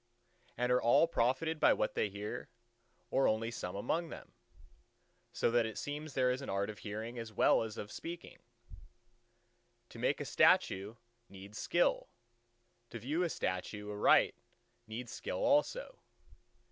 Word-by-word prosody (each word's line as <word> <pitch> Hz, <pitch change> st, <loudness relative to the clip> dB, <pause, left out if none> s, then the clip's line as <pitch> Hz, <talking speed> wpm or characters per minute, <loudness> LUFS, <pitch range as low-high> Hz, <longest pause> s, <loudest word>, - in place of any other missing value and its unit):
"And 125 Hz, +1 st, +1 dB
are 125 Hz, -, +4 dB
all 120 Hz, +8 st, +5 dB
profited 155 Hz, +3 st, 0 dB
by -, -, +6 dB
what 105 Hz, -, -1 dB
they 105 Hz, -, 0 dB
hear, 105 Hz, +4 st, -6 dB, 0.6 s
or 135 Hz, -, +3 dB
only 115 Hz, +1 st, 0 dB
some 90 Hz, -5 st, -5 dB
among 165 Hz, +11 st, -1 dB
them? -, -, -10 dB, 1.0 s
So -, -, +1 dB
that 120 Hz, -1 st, +3 dB
it 110 Hz, -, -7 dB
seems 145 Hz, 0 st, -5 dB
there 125 Hz, -1 st, +3 dB
is 130 Hz, +2 st, -2 dB
an 135 Hz, -, -6 dB
art 100 Hz, +2 st, -1 dB
of 105 Hz, -, -13 dB
hearing 110 Hz, +5 st, -5 dB
as 115 Hz, -1 st, -6 dB
well 105 Hz, -, +4 dB
as 110 Hz, -1 st, -5 dB
of 105 Hz, -, -6 dB
speaking.... 170 Hz, +1 st, -8 dB, 1.5 s
To -, -, -11 dB
make -, -, +1 dB
a -, -, -3 dB
statue 100 Hz, +4 st, +3 dB, 0.3 s
needs 100 Hz, +2 st, -10 dB
skill: 175 Hz, -, +1 dB, 0.8 s
to -, -, -6 dB
view 140 Hz, +10 st, -1 dB
a 175 Hz, -, +1 dB
statue 105 Hz, -, -3 dB
aright 105 Hz, 0 st, +4 dB, 0.5 s
needs 115 Hz, +2 st, -6 dB
skill -, -, -4 dB
also." 295 Hz, -, +1 dB
115 Hz, 150 wpm, -34 LUFS, 105-145 Hz, 1.5 s, by